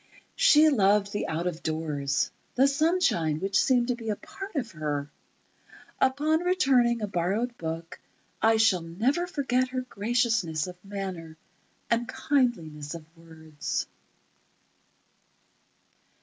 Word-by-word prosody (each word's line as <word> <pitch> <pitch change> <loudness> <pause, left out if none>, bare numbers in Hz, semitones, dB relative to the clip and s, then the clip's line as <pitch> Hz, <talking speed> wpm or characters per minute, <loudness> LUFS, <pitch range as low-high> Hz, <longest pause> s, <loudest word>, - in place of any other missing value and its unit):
She 305 +1 +6
loved 205 -5 +3
the 205 - -2
out 160 +2 -2
of 175 -2 -3
doors—the 155 - -1
sunshine, 280 - +1
which 195 +2 +2
seemed 250 -2 +2
to 250 - +1
be 230 -2 -6
a 210 - 0
part 390 - -9
of 245 -6 -2
her.... 150 -3 -3 0.9
Upon 295 +4 +2
returning 260 - +2
a - - 0
borrowed 200 +7 -1
book, 165 +1 -5 0.4
I 225 0 +4
shall 215 -5 +4
never 235 - -1
forget 260 -6 0
her 255 0 -3
graciousness 225 -8 0
of 180 -1 -10
manner 190 -5 -6 0.5
and 235 +2 0
kindliness 170 - -1
of 165 -2 -9
words.... 160 -2 -5
205 Hz, 120 wpm, -27 LUFS, 165-255 Hz, 0.9 s, She